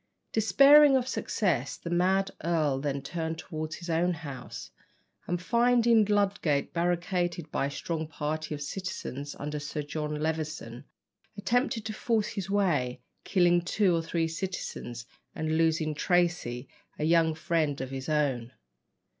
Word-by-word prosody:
Despairing 275 +7 +7
of 255 -1 -2
success, 175 - -1
the 170 - -7
mad 190 +3 +2
earl 155 -5 +1
then 140 -1 -2
turned 160 -1 -3
towards 155 -2 -5
his 175 - -9
own 170 +1 +1
house, 140 -5 -8 0.6
and 175 0 -1
finding 235 +2 +4
Ludgate 200 -8 +1
barricaded 175 -1 -1
by 140 - 0
a - - -4
strong 160 +2 -3
party 155 0 -3
of 145 - -6
citizens 145 -5 -5
under 150 +1 -4
Sir 145 +1 -4
John 150 +1 -3
Levison, 155 -5 -3 0.5
attempted 235 +2 0
to 220 - -3
force 220 -1 0
his 195 -2 -5
way, 165 -12 +1 0.3
killing 175 -2 +4
two 180 +1 +2
or 165 - +1
three 165 0 -1
citizens, 160 -8 -5 0.3
and 155 0 -1
losing 160 -1 +2
Tracy, 170 -7 0 0.3
a - - -3
young 160 0 +3
friend 160 -4 0
of 130 0 -5
his 135 +2 -5
own. 135 -6 0
165 Hz, 140 wpm, -29 LUFS, 150-190 Hz, 0.6 s, Despairing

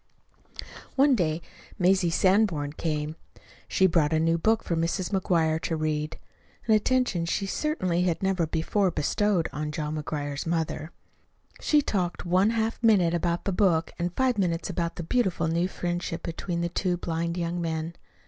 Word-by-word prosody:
One 280 +1 +5
day 165 -6 0 0.3
Mazie 185 -1 +3
Sanborn 175 -5 +2
came. 155 -1 -2 0.5
She 190 - +3
brought 165 -4 +3
a 160 - +3
new 165 +1 +2
book 220 +5 +2
for 170 - -1
Mrs. 170 +3 -1
McGuire 165 -5 +1
to 165 - -1
read 155 0 -2 0.5
an 220 - +3
attention 215 -6 +2
she 195 +4 -1
certainly 185 - -1
had 180 0 0
never 190 -4 +1
before 180 +5 +1
bestowed 175 +3 +1
on 150 0 -3
John 155 -1 -3
McGuire's 145 0 -4
mother. 160 -1 -2 0.7
She 300 -1 +3
talked 180 -9 -2
one 185 +4 +3
half 225 0 -1
minute 200 -7 +4
about 170 0 -1
the 200 - 0
book 175 -4 +2
and 175 +1 -1
five 255 -4 +1
minutes 170 -3 0
about 170 -1 -2
the 170 - -5
beautiful 190 -3 0
new 170 +2 +1
friendship 175 -2 -3
between 170 +1 -3
the 170 - -1
two 180 0 -1
blind 170 0 -2
young 175 0 -2
men. 160 0 -3
170 Hz, 160 wpm, -27 LUFS, 160-195 Hz, 0.7 s, One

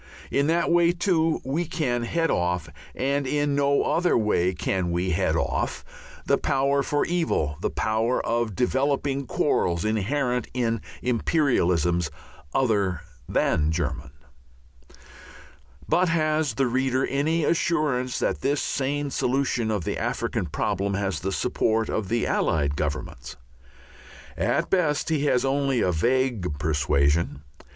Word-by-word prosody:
In 140 +1 +2
that 170 +2 +1
way, 170 0 +4
too, 170 -3 +1
we 150 +7 -1
can 150 -7 -1
head 165 +8 0
off 90 -1 0 0.3
and 140 +1 0
in 145 +1 0
no 140 0 +2
other 175 +1 +2
way 105 -5 +2
can 90 0 -1
we 90 +2 -1
head 85 - +1
off - - -2 0.4
the - - +2
power 140 0 +1
for 145 +1 0
evil, 160 - 0
the - - 0
power 110 +3 0
of 115 -3 -1
developing 135 +2 0
quarrels 85 - 0
inherent 125 +3 0
in 115 -3 0 0.2
"imperialisms" 90 - +1 0.4
other 100 - +1 0.3
than 75 0 +1
German. 75 -3 -3 1.8
But 180 0 +2
has 155 -2 +1
the 135 - +2
reader 130 +1 +1
any 155 +4 0
assurance 150 -6 0
that - - -1
this 140 +1 +1
sane 140 +1 -2
solution 125 -4 0
of 105 -5 -1
the - - -3
African - - -2
problem 100 +1 -1
has 95 -5 -1
the 95 +5 -3
support 110 0 0
of 105 -3 -2
the 115 0 +1
Allied 70 -2 +1
Governments? 70 -4 -4 1.0
At - - 0
best 160 -6 +1
he 150 -2 +1
has 125 -3 +2
only 135 -1 +1
a 90 - +2
vague 115 - 0
persuasion. 75 0 +1
125 Hz, 130 wpm, -25 LUFS, 90-145 Hz, 1.8 s, way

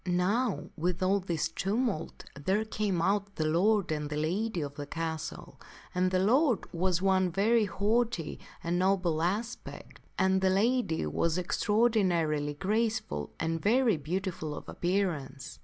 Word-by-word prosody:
Now 180 - 0
with 175 +2 -1
all 195 +2 +3
this 170 -4 -1
tumult, 195 +1 -2
there 190 +10 0
came 205 -5 -1
out 200 +1 0
the 155 - -1
lord 185 +4 +2
and 150 -1 -2
the 150 - -3
lady 180 +5 -1
of 140 -1 -4
that 145 -1 -6
castle; 160 -2 -5 0.3
and 185 +1 +2
the 185 - +1
lord 240 - +3
was 180 +1 0
one 190 -1 +3
of 175 - -7
very 220 +3 +3
haughty 205 -3 0 0.2
and 175 +1 0
noble 180 -4 +2
aspect, 210 +8 -4 0.2
and 190 0 +3
the 190 - +3
lady 205 - +1
was 160 - 0
extraordinarily 180 -7 +1
graceful 205 - -1
and 165 0 -1
very 230 +1 +3
beautiful 165 0 -3
of - - -9
appearance. 170 -6 -2
185 Hz, 145 wpm, -30 LUFS, 165-210 Hz, 0.3 s, all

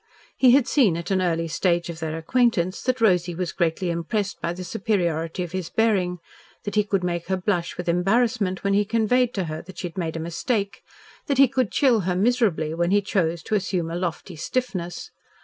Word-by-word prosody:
He 260 - +5
had 270 -1 +4
seen 225 - +3
at 170 +3 -5
an 190 -1 +2
early 165 -2 0
stage 170 +1 0
of 170 -2 -7
their 160 -1 -3
acquaintance 185 0 +1
that 255 -1 -1
Rosy 180 -5 +3
was 180 0 -2
greatly 170 +1 0
impressed 190 +5 -2
by 170 - -1
the 180 +1 -6
superiority 175 -5 -1
of 175 - -7
his 185 -3 -4
bearing, 195 -6 +1 0.5
that 205 - -4
he 210 0 +3
could 200 -2 -1
make 170 -1 -2
her 190 0 0
blush 180 -2 -1
with 180 - -5
embarrassment 195 +2 +1
when 200 0 +1
he 205 +1 +4
conveyed 230 +3 +2
to 195 - 0
her 155 -2 -5
that 185 0 -13
she 180 - -3
had 170 - -8
made 165 -2 -3
a - - -3
mistake, 200 +5 -2 0.5
that 280 -3 0
he 275 0 +7
could 255 -3 0
chill 255 -5 +3
her 180 -2 -1
miserably 195 -7 +1
when 170 +1 0
he 205 +2 +4
chose 170 -4 0
to - - -5
assume 180 -5 0
a - - -3
lofty 175 0 -4
stiffness. 185 - -3
185 Hz, 210 wpm, -24 LUFS, 170-215 Hz, 0.5 s, he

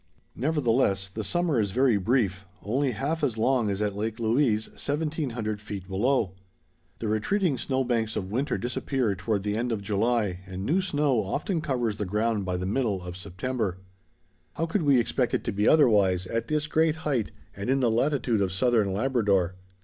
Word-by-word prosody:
Nevertheless, 120 - +1
the 110 +3 -5
summer 175 -2 +1
is 100 - 0
very 130 -2 +4
brief—only 105 +4 -1
half 145 +8 -2
as 125 -6 0
long 120 -1 +2
as 100 +1 -1
at 105 -1 -1
Lake 110 +2 -3
Louise, 115 -1 +2
1700 140 -8 -3
feet 100 -3 -7
below. 105 +1 +1 0.7
The 115 - -4
retreating 135 - +1
snow 130 -1 0
banks 115 -3 -1
of 95 -1 -3
winter 130 +4 0
disappear 120 +1 -1
toward 95 +2 -2
the 105 0 -1
end 120 +2 -1
of 105 -3 -2
July 105 -2 0
and 95 0 -5
new 175 - +2
snow 145 - +1
often 155 - -2
covers 120 -9 -1
the 105 - -2
ground 105 +1 0
by 90 -1 -1
the 90 - -3
middle 105 -3 0
of 90 0 -7
September. 95 +2 -3 0.8
How 165 - -1
could 170 +4 0
we 140 -4 +4
expect 120 +1 0
it - - -2
to - - -2
be 105 +1 +1
otherwise 100 - +4
at 115 +4 -2
this 150 -1 0
great 160 +1 +2
height 130 -8 0 0.2
and 100 +3 -4
in 135 +1 +3
the 120 -3 +2
latitude 120 -2 +1
of 95 -2 +1
Southern 110 +1 +2
Labrador? 100 -6 +1
115 Hz, 180 wpm, -27 LUFS, 100-135 Hz, 0.8 s, very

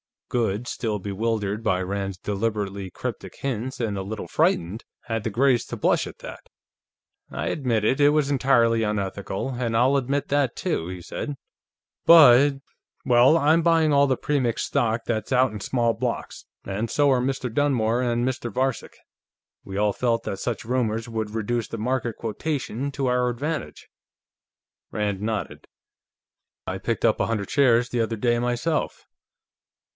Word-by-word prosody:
Goode, 115 -1 -1
still 110 -3 -2
bewildered 105 +1 -2
by 95 -5 +1
Rand's 95 0 -3
deliberately 100 -1 -3
cryptic - - -6
hints 130 -1 -3
and 105 -4 -1
a - - -2
little 105 +3 -6
frightened, 90 +7 0 0.2
had 115 -1 -4
the - - +1
grace 125 +3 +2
to - - -6
blush - - +1
at - - -11
that. - - -10 0.8
"I - - -4
admit 120 -7 0
it; 130 +6 +2
it 145 0 +6
was 145 -1 +1
entirely 120 -4 +3
unethical, 100 0 -2
and 120 -3 -2
I'll 130 +4 +4
admit 140 +2 -1
that, 145 -2 +1
too," 160 - -2
he 90 0 -6
said. 145 - -5 0.7
"But.... 140 -3 +7 0.4
Well, 125 +4 +5
I'm 160 +2 +4
buying 165 -2 +3
all 140 0 +4
the 130 - +2
Premix 130 -6 0
stock 115 0 0
that's 110 +2 -2
out 130 -1 +3
in 105 - -6
small 115 +2 0
blocks, - - -4 0.2
and 105 +4 -3
so 145 -1 +3
are 130 -2 +3
Mr. 130 -2 -2
Dunmore 120 -4 +1
and 120 -1 0
Mr. 120 -2 -3
Varcek. 130 +1 -2 0.7
We 95 - -7
all 105 0 +2
felt 115 0 0
that 95 - -4
such 115 -4 -3
rumors 115 -2 -1
would 110 -2 -3
reduce 115 +1 -1
the 115 - -6
market 120 0 -1
quotation, 130 +3 -3
to 135 -1 -1
our 125 0 +2
advantage." 145 +7 -4 1.0
Rand 105 -2 -2
nodded. 110 0 -4 1.0
"I 95 - -3
picked 115 +3 -2
up 110 -2 +3
a - - +1
hundred 105 -4 -2
shares, 125 -4 +3
the 120 - 0
other 115 0 -1
day, 120 +2 +1
myself. 125 +7 -1
120 Hz, 160 wpm, -24 LUFS, 105-130 Hz, 1.0 s, But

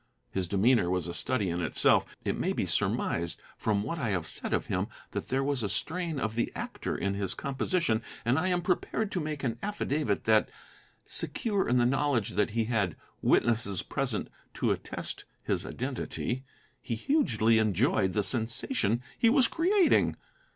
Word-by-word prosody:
His 95 -2 -1
demeanor 100 +1 +3
was 90 -1 0
a 85 - -4
study 100 0 0
in 85 +1 -2
itself. 80 - +4 0.2
It - - 0
may - - 0
be - - -1
surmised, 85 -1 0 0.2
from 105 -2 0
what 165 +9 -3
I 120 -7 -1
have 90 -5 -1
said - - -4
of - - +1
him, - - -1 0.2
that - - -4
there 135 +1 0
was 140 -2 0
a 105 - -1
strain 165 - -2
of 110 -2 -1
the 120 +1 -1
actor - - -4
in 100 +2 -1
his 100 -1 -1
composition; 140 -3 0 0.2
and 125 +6 +3
I 185 - 0
am 180 -1 +1
prepared 195 +4 0
to 180 - -1
make 150 -3 -4
an 115 -3 -2
affidavit 150 - -1
that, 110 -1 +3 0.6
secure 205 - 0
in 125 - +3
the 120 - +4
knowledge 135 -4 +1
that 105 +4 +1
he 115 +1 0
had 105 -7 0 0.3
witnesses 115 -5 +2
present 135 -6 -2 0.3
to - - +1
attest - - -4 0.2
his - - -1
identity, 130 0 -3 0.4
he 115 - -3
hugely 115 - +2
enjoyed 105 - +2
the 105 - +1
sensation 115 - +1 0.2
he 230 - +5
was 255 0 +6
creating. 360 - +3
120 Hz, 170 wpm, -29 LUFS, 105-155 Hz, 0.6 s, was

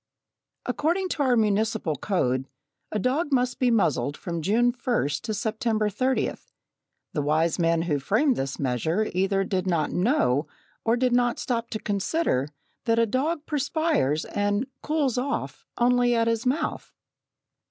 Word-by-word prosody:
According 330 +9 0
to 315 - -2
our 255 -3 +3
municipal 215 -5 +1
code, 130 -7 0 0.4
a - - -1
dog 275 - 0
must 250 -2 +1
be 255 - +3
muzzled 145 - +1
from 170 -3 -4
June 230 +8 +3
1st 240 - -1
to - - -4
September 220 0 0
30th. 255 +6 -1 0.6
The 150 - 0
wise 155 +4 +1
men 165 -1 +2
who 150 -4 0
framed 240 - +2
this 135 -5 -3
measure 160 - 0
either 195 +2 +1
did 190 -1 -2
not 165 -4 +1
know, 180 - +2 0.4
or 230 +1 +2
did 250 0 +2
not 245 -1 +2
stop 235 -2 -2
to 215 - -4
consider, 200 - 0 0.4
that 230 -1 +2
a 230 - +4
dog 290 +7 -1
perspires 290 - 0
and 205 +3 0 0.2
"cools 290 -5 0
off" 275 +3 -4
only 245 0 +3
at 230 0 +2
his 230 +1 0
mouth. 305 +5 -1
225 Hz, 150 wpm, -26 LUFS, 175-255 Hz, 0.6 s, a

